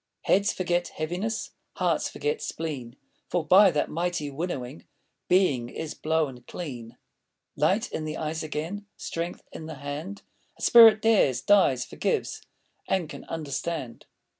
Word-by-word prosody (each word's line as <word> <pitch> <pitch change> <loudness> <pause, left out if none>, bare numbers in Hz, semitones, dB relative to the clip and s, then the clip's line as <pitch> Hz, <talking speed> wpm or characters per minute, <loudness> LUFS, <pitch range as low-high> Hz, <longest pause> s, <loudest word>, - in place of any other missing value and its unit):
Heads 200 +1 +3
forget 175 -1 0
heaviness, 180 +8 -3 0.2
Hearts - - 0
forget 450 +1 -2
spleen, 135 -7 -5 0.3
For 175 -3 0
by 190 +5 +7
that 150 -4 0
mighty 170 -3 -2
winnowing 140 -3 -5 0.4
Being 145 -11 +3
is 160 +3 -5
blown 155 -5 -1
clean. 125 -9 -7 0.6
Light 190 +10 +1
in 155 - -3
the 155 +1 -4
eyes 155 0 -3
again, 165 +7 -4
Strength 170 +1 -5
in 160 - -8
the 160 - -6
hand, 145 +8 -6 0.3
A - - -10
spirit 225 -2 +8
dares, 210 - +4
dies, 160 -12 +4
forgives, - - -2 0.5
And 185 -4 0
can - - -9
understand! 155 -3 -4
160 Hz, 135 wpm, -27 LUFS, 145-185 Hz, 0.6 s, spirit